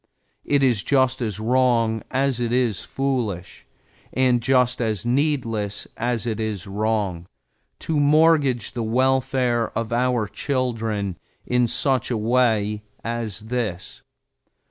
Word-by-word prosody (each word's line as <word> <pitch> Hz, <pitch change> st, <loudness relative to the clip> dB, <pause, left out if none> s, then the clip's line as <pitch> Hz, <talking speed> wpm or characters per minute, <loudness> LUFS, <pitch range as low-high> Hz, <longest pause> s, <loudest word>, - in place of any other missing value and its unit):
It 145 Hz, -1 st, +2 dB
is 120 Hz, -6 st, +3 dB
just 130 Hz, 0 st, +2 dB
as 105 Hz, -4 st, -2 dB
wrong 115 Hz, -1 st, +2 dB
as 135 Hz, -1 st, 0 dB
it 120 Hz, -1 st, -1 dB
is 120 Hz, -5 st, +1 dB
foolish, 120 Hz, -10 st, -3 dB, 0.4 s
and 125 Hz, -2 st, +2 dB
just 125 Hz, 0 st, +2 dB
as 110 Hz, -3 st, -1 dB
needless 120 Hz, -6 st, -1 dB
as 120 Hz, -1 st, -1 dB
it 115 Hz, -2 st, -2 dB
is 110 Hz, -3 st, -3 dB
wrong, 100 Hz, -4 st, -2 dB, 0.5 s
to 155 Hz, -2 st, -1 dB
mortgage 145 Hz, -5 st, +3 dB
the 120 Hz, -, -4 dB
welfare 125 Hz, 0 st, +1 dB
of 115 Hz, 0 st, -2 dB
our 125 Hz, -2 st, +1 dB
children 110 Hz, -, -2 dB, 0.3 s
in 125 Hz, -1 st, +2 dB
such 130 Hz, +1 st, +1 dB
a 120 Hz, -, 0 dB
way 110 Hz, -2 st, +1 dB, 0.2 s
as 115 Hz, -3 st, -3 dB
this. 110 Hz, -5 st, -4 dB
120 Hz, 120 wpm, -23 LUFS, 110-130 Hz, 0.5 s, is